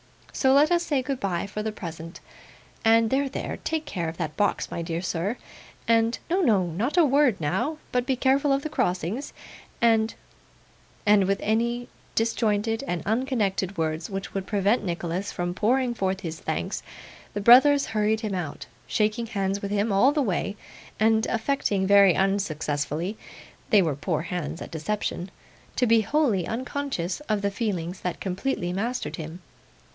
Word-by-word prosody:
So 265 -1 +3
let 290 +4 +5
us 345 -1 +4
say 285 -6 0
goodbye 200 -11 -2
for 205 +1 -5
the 220 0 -2
present, 165 -3 -8 0.6
and 225 0 +4
there, 275 +1 +1
there - - -4
take 315 -1 -2
care 175 - -3
of 160 - -9
that 155 -3 -3
box, 205 - 0
my - - -3
dear 165 0 -3
sir 185 +5 -2 0.5
and 230 +1 +3
no, 375 +2 +3
no, 210 - +3
not 205 - -2
a 340 - +7
word 275 -5 +3
now; 185 - -1
but 250 0 0
be 265 - +2
careful 275 +3 +2
of 275 +1 +1
the 310 - -3
crossings 190 - -1 0.5
and 225 -1 +3 0.4
' - - -31
And 205 -2 +5
with 195 +1 +1
any 235 +3 0 0.3
disjointed 225 0 +1
and 175 -1 -2
unconnected 210 -5 0
words 160 +1 -2
which 195 0 -5
would 195 -1 -3
prevent 205 +3 +2
Nicholas 175 +1 -3
from 175 0 -3
pouring 245 +5 +1
forth 190 -3 -1
his 165 -3 -5
thanks, - - -3 0.5
the 205 - -1
brothers 270 +6 +7
hurried 215 0 +1
him 215 -3 -3
out: 175 -6 -4 0.2
shaking 220 +2 0
hands 200 -2 -1
with 200 - -3
him 205 +2 0
all 200 +8 +5
the 290 -1 +1
way, 200 -1 -1 0.4
and 220 0 +3
affecting 225 -5 0
very 200 -2 +6
unsuccessfully 170 -2 -1 0.5
they 210 -6 +6
were 155 -5 0
poor 155 +2 -2
hands 170 -2 -4
at - - -10
deception! 180 +2 -3 0.5
to 250 - +2
be 230 -1 +5
wholly 225 - +1
unconscious 255 -6 -3
of 210 -2 0
the 200 - +1
feelings 190 -4 -3
that 180 - -4
completely 185 -1 -2
mastered 235 +7 -2
him. 165 +2 -7
205 Hz, 165 wpm, -26 LUFS, 180-245 Hz, 0.6 s, a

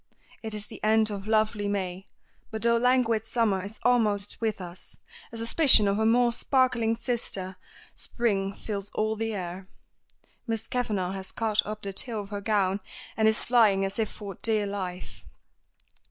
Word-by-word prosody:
It 220 -1 -4
is 210 0 -4
the 220 - -9
end 220 0 +4
of 200 0 -6
lovely 215 -1 +1
May, 190 -2 -3 0.4
but 220 0 -5
though 235 0 +4
languid 235 -2 +2
Summer 215 -6 +1
is 205 +2 -8
almost 215 -5 +1
with 220 -2 -1
us, 180 -1 -9 0.3
a 230 - -7
suspicion 230 -1 +5
of 200 0 +1
her 220 0 +2
more 240 +1 +4
sparkling 245 -3 +1
sister 210 -6 -3 0.4
Spring 200 -5 -1
fills 200 0 -6
all 215 0 0
the 225 0 -2
air. 185 0 -6 0.8
Miss 225 -2 -1
Kavanagh 210 -7 -1
has 190 -1 -4
caught 215 -2 +1
up 215 0 -6
the 195 -1 -4
tail 220 +1 +2
of 200 - -10
her 205 -1 -4
gown, 200 -2 +1 0.4
and 220 -1 +3
is 220 0 +3
flying 215 -5 +4
as 195 +3 -4
if 220 - 0
for 200 -2 -8
dear 215 -2 +1
life. 185 -3 -6
215 Hz, 170 wpm, -27 LUFS, 195-230 Hz, 0.8 s, suspicion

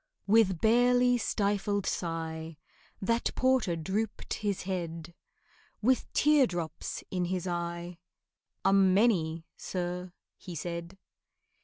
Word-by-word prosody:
With 200 -5 +4
barely 245 +2 +4
stifled 205 -2 0
sigh 160 -2 -3 0.5
That 230 +4 +1
porter 255 -9 +2
drooped 195 +7 -3
his 205 -3 -2
head, 170 -3 -4 0.7
With 255 +4 +1
teardrops 190 - +1
in 180 -1 0
his 180 0 -2
eye, 170 0 -4 0.7
"A 195 - +5
many, 190 -4 +3
sir," 180 0 -4 0.3
he 180 - -8
said. 170 +3 -5
185 Hz, 100 wpm, -30 LUFS, 170-215 Hz, 0.7 s, A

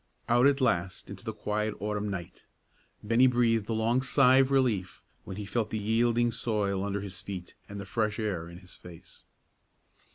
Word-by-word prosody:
Out 120 +3 +5
at 140 -1 +2
last 95 -6 -1
into 100 -1 -10
the 110 - -3
quiet 105 0 -2
autumn 105 0 -2
night! 90 -2 -7 0.6
Bennie 115 +4 +4
breathed 115 -3 +2
a - - 0
long 115 +3 +1
sigh 130 -1 +4
of 135 0 +4
relief 110 -10 0 0.2
when 95 - -7
he 105 - -5
felt 110 +1 -1
the 110 - -3
yielding 115 +3 +2
soil 100 -5 -1
under 100 0 -2
his 95 -2 -6
feet 95 -3 -7 0.2
and 100 0 -7
the 100 - -6
fresh 105 +1 -1
air 95 -7 -3
in 85 - -10
his 90 -1 -14
face. 85 -2 -14
105 Hz, 185 wpm, -29 LUFS, 100-120 Hz, 0.6 s, Out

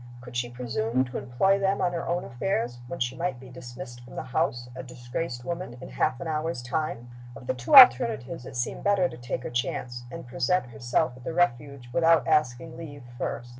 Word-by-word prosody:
Could 125 0 -11
she 120 0 -1
presume 120 0 -1
to 125 - -5
employ 135 +11 +2
them 195 0 +1
on 175 -1 +1
her 170 - -3
own 175 +1 0
affairs, 120 -2 -2
when 170 - -6
she 120 +1 -1
might 170 -8 -2
be 130 0 -12
dismissed 120 -1 -9
from 120 - -13
the - - -4
house, 120 -1 -1
a 130 - -5
disgraced 125 +1 -5
woman, 170 -7 -4
in - - -9
half 60 - 0
an - - -5
hour's 155 -4 -2
time? 125 -2 -2 0.3
Of 120 - -11
the - - 0
two 120 - +1
alternatives 230 - +7
it 130 - -9
seemed 120 -1 -2
better 200 -3 +3
to 120 - -10
take 120 +1 -4
her - - -5
chance, 120 0 -3
and 120 - -8
present 130 +8 +1
herself 120 +5 0
at 130 - -14
the 160 - -4
Refuge 140 -5 0
without 165 -1 +4
asking 155 -1 +1
leave 145 -4 -9
first. 120 0 -4
125 Hz, 205 wpm, -27 LUFS, 120-165 Hz, 0.3 s, alternatives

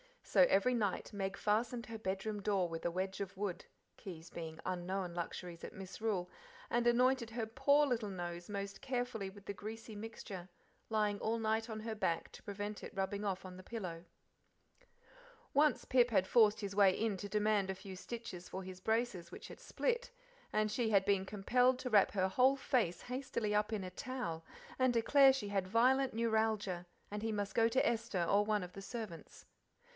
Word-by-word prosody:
So 275 - +5
every 200 +6 +4
night 210 -3 -1
Meg 195 -1 -2
fastened 230 +3 0
her 230 -1 -5
bedroom 205 0 -3
door 195 -3 +1
with 165 0 -5
a - - +3
wedge 190 +2 -2
of 200 -1 -4
wood, 195 -3 -3 0.3
keys 170 -3 -9
being 160 -1 -6
unknown 185 0 -2
luxuries 170 0 -5
at - - -7
Misrule, 190 -1 -3 0.4
and 240 0 +2
anointed 245 -1 +3
her, 230 0 -2
poor 275 +6 +4
little 235 -6 -1
nose 175 -1 -5
most 200 -1 -4
carefully 245 -6 -2
with 200 +1 -14
the 200 - -3
greasy 220 +3 -7
mixture, 205 -4 -7 0.4
lying 210 -2 +1
all 225 +1 0
night 220 +1 0
on 215 -1 -4
her 225 0 -3
back 170 -6 -1
to - - -12
prevent 205 +1 -5
it - - -9
rubbing 195 +2 -1
off 190 -1 -2
on 185 -1 -8
the - - -9
pillow. 180 -7 -5 1.5
Once 295 0 +3
Pip 245 -1 +4
had 200 -5 +3
forced 215 0 +5
his 200 -1 -4
way 195 -2 +5
into 205 -3 -1
demand 210 -1 +2
a 190 - -1
few 190 0 -9
stitches 185 -3 -7
for 190 - -5
his 185 0 -8
braces 220 -4 -1
which - - -9
had - - -10
split, - - -1 0.4
and 215 0 +2
she 230 0 +1
had 200 -3 +4
been 195 -1 +2
compelled 245 +6 +3
to 250 - -3
wrap 205 -2 +6
her 190 -1 +1
whole 260 +6 +5
face 235 - 0
hastily 250 -4 -2
up 210 +1 +1
in 205 -3 -1
a 185 - -6
towel 180 -7 -4 0.3
and 255 -1 +4
declare 270 +4 +6
she 240 -6 -3
had 195 -2 0
violent 255 +5 +3
neuralgia, 220 -5 0 0.2
and 210 0 -3
he 225 0 -1
must 205 -1 -2
go 230 -1 +4
to 260 +3 +2
Esther 225 -6 0
or 200 +4 +3
one 210 -2 +1
of 180 - -7
the 195 - -8
servants. 195 -6 -7
210 Hz, 190 wpm, -36 LUFS, 190-230 Hz, 1.5 s, wrap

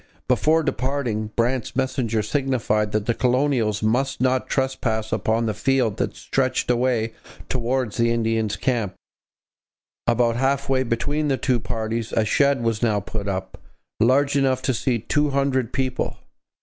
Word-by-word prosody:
Before 160 +1 +3
departing, 130 -6 -1
Brant's 120 0 0
messenger 125 -4 0
signified 110 -4 0
that 105 -1 -1
the 115 - +1
colonials 125 -4 +1
must 130 +5 +1
not 130 0 +1
trespass 120 -5 -1
upon 115 +1 +1
the 110 - 0
field 120 -1 +1
that - - -2
stretched 130 -2 0
away 120 -2 +1 0.4
towards 125 -2 -1
the 115 0 +3
Indians' 115 -2 0
camp. 115 -8 -1 1.1
About 115 0 +2
half 135 +2 +1
way 135 -1 +2
between 145 +5 -1
the 135 -2 +1
two 125 -2 +1
parties 115 0 -3
a 110 - +2
shed 140 +2 +2
was 115 -2 0
now 110 -4 +2
put 100 +1 -5
up, 95 -1 -4 0.4
large 140 +5 +3
enough 130 -2 +2
to 130 - +1
seat 120 -1 -1
two 150 0 +2
hundred 135 -3 0
people. 130 -1 -2
125 Hz, 150 wpm, -23 LUFS, 110-135 Hz, 1.1 s, Before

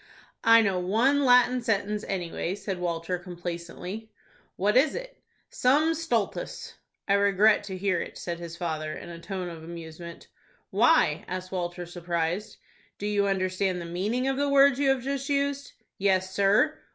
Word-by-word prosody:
"I 230 0 +7
know 195 -3 +1
one 235 +10 +2
Latin 250 0 +5
sentence, 210 -2 -1
anyway," 175 0 -3
said 195 -2 -5
Walter, 175 0 -2
complacently. 175 +4 -7 0.4
"What 205 +3 +1
is 275 +3 +4
it?" - - -8 0.3
"Sum 295 +6 +3
stultus." 245 -11 -2 0.3
"I 200 - +3
regret 200 +1 +4
to 190 -2 -5
hear 185 -2 0
it," - - -7
said 170 -1 -5
his 170 -1 -8
father, 155 -3 -3
in - - -9
a 170 -1 -8
tone 185 +1 -5
of 165 -2 -8
amusement. 170 0 -9 0.4
"Why?" - - +3
asked 185 0 -5
Walter, 175 -1 -3
surprised. 175 +2 -3 0.4
"Do 205 - -5
you 205 -1 +1
understand 185 -1 0
the 170 - -6
meaning 205 +10 -1
of 270 0 0
the 285 0 +1
words 280 -1 +5
you 280 -1 +3
have 265 -2 +1
just 275 +1 -3
used?" 280 0 -1 0.3
"Yes, 190 -1 +1
sir." 205 +11 +3
195 Hz, 160 wpm, -27 LUFS, 175-245 Hz, 0.4 s, I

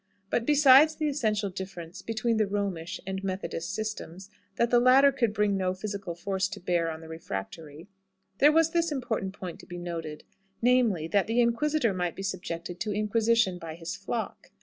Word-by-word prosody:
But 230 - 0
besides 295 +1 +7
the 310 - -1
essential 215 -8 0
difference 185 -1 -7
between 225 +2 -1
the 215 -2 +2
Romish 195 -5 -3
and 190 0 -4
Methodist 185 -2 -3
systems 200 -3 -5 0.2
that 235 0 +1
the 240 - +6
latter 265 +3 +6
could 240 -5 0
bring 210 -1 +1
no 185 -1 0
physical 195 -3 -5
force 190 +2 -1
to - - -8
bear 175 -2 0
on 160 0 -6
the 160 - -11
refractory, 155 - -7 0.5
there 295 +2 +7
was 325 +1 +3
this 335 -1 +1
important 225 -8 -2
point 185 -3 -7
to - - -14
be 175 - -7
noted: 165 -3 -6 0.4
namely, 230 -9 +2
that 200 +2 +2
the 230 +2 +1
inquisitor 240 0 +2
might 180 -2 -2
be 195 - -6
subjected 175 -2 -5
to 215 - -2
inquisition 215 -2 +1
by 160 -2 -7
his 170 +2 -6
flock. 215 +4 -5
200 Hz, 180 wpm, -28 LUFS, 175-235 Hz, 0.5 s, besides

